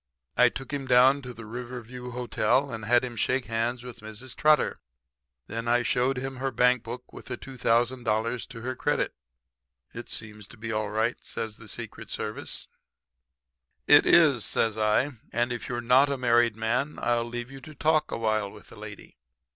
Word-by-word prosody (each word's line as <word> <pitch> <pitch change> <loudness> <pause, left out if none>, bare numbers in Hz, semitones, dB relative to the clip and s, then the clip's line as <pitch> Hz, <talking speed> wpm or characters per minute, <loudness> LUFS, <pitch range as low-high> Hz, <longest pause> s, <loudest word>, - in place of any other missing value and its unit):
"I 125 0 +6
took 135 +3 -7
him 140 -2 -3
down 130 +3 +6
to 125 -2 -7
the 115 -2 -10
Riverview 125 +1 -7
Hotel 125 +2 +1
and 115 -1 -5
had 120 +3 +4
him 120 -2 -7
shake 130 +3 0
hands 115 +2 -1
with 125 -2 -9
Mrs. 110 +4 -9
Trotter. 155 0 +3 0.7
Then 115 +6 -5
I 120 +1 +3
showed 125 +2 +1
him 135 +1 -4
her 135 +1 -1
bank 125 0 +3
book 120 +2 -8
with - - -10
the - - -5
$2,000 120 -2 0
to 125 -3 -9
her 130 +2 -3
credit. 145 +3 0 0.8
"'It - - -8
seems 105 -2 -5
to 120 - -14
be 115 +1 -5
all 110 -1 -1
right,' 110 +3 -1
says 110 -2 -5
the - - -12
Secret - - -7
Service. - - -4 1.2
"'It - - +7
is,' 145 -9 +6
says 115 -2 +1
I. 110 +6 +2 0.2
'And 120 +1 0
if 120 - -6
you're 120 -1 -2
not 130 +4 +5
a 140 - -1
married 120 -2 +3
man 120 +6 -1
I'll 120 -1 +1
leave 120 +1 -6
you 135 0 -10
to 155 +2 -11
talk 155 +2 +2
a - - -2
while 110 -2 0
with - - -14
the - - -13
lady. - - -10
120 Hz, 185 wpm, -27 LUFS, 115-130 Hz, 1.2 s, It